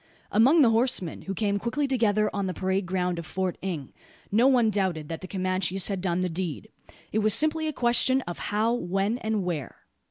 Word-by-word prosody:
Among 260 +10 +5
the 240 -5 +5
horsemen, 225 -7 0
who 195 - -5
came 200 -1 0
quickly 275 +6 -1
together 215 -5 +2
on 200 -1 -1
the 185 - -4
parade 190 0 -1
ground 180 -2 -1
of 170 - -9
Port 185 -1 -1
Inge, 170 -8 -5 0.4
no 230 +6 +4
one 245 -5 +4
doubted 185 -7 -1
that 165 - -5
the 185 - -7
Comanches 185 0 -1
had 195 -2 -2
done 180 -1 0
the 185 - 0
deed. 180 +3 -4 0.4
It 215 - +1
was 215 -1 +4
simply 315 +1 +1
a - - 0
question 255 +1 +3
of 175 -8 -7
how, 215 +3 +1
when, 195 +2 -1
and 220 -3 -1
where. 170 -6 -5
200 Hz, 200 wpm, -26 LUFS, 185-230 Hz, 0.4 s, Among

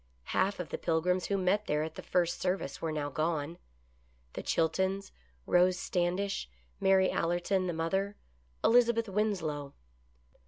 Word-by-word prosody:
Half 195 +1 +1
of 180 - -4
the - - -4
Pilgrims 180 +2 +1
who 200 - +1
met 195 +3 +1
there 150 +1 +1
at 160 - -5
the - - -8
first 175 -2 0
service 180 -7 -2
were 165 - -1
now 145 -2 -2
gone: 160 +2 -1 0.7
the - - -4
Chiltons, 190 +4 0 0.3
Rose 180 +1 +4
Standish, 180 - -1 0.3
Mary 190 -1 +4
Allerton, 175 +2 0
the 175 - -1
mother, 190 +5 -1 0.5
Elizabeth 235 -1 +4
Winslow. 180 -9 -1
180 Hz, 135 wpm, -31 LUFS, 160-195 Hz, 0.7 s, Rose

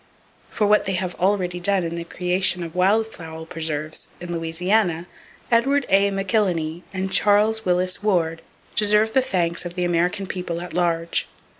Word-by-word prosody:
For 210 - 0
what 210 +1 +3
they 190 -2 -1
already 180 0 -1
have - - -15
done 195 -1 +2
in 165 0 -3
the 170 0 -4
creation 180 +1 0
of 165 -1 -7
wild 210 +5 +2
fowl 160 -1 -8
preserves 160 -2 -3
in 175 0 -6
Louisiana, 170 +2 0 0.5
Edward 270 +4 +3
A. 195 +1 +4
McIlhenny 185 -5 -1
and 190 0 -3
Charles 215 +2 +3
Willis 180 +1 +2
Ward 165 -6 0 0.3
deserve 210 +1 +3
the 265 - +4
thanks 180 -9 0
of 175 0 -7
the 180 - -1
American 175 +3 0
People 180 -2 -4
at 175 -1 -8
large. 170 -1 0
180 Hz, 160 wpm, -22 LUFS, 170-205 Hz, 0.5 s, A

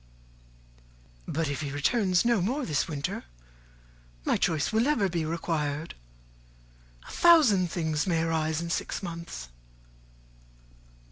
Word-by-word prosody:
"But 160 +1 -1
if 140 +2 -3
he 145 - -3
returns 185 - +2
no 235 -5 +3
more 255 +9 -1
this 150 -4 0
winter, 145 - -4 1.0
my - - +2
choice 160 +2 0
will 220 - +3
never 260 -6 +2
be 170 -3 -2
required. 155 -2 -2 1.1
A - - -10
thousand 260 - +5
things 160 -1 -1
may 165 -3 +1
arise 160 -1 0
in 170 0 -4
six - - -3
months." 170 - -7
165 Hz, 120 wpm, -28 LUFS, 155-195 Hz, 1.1 s, thousand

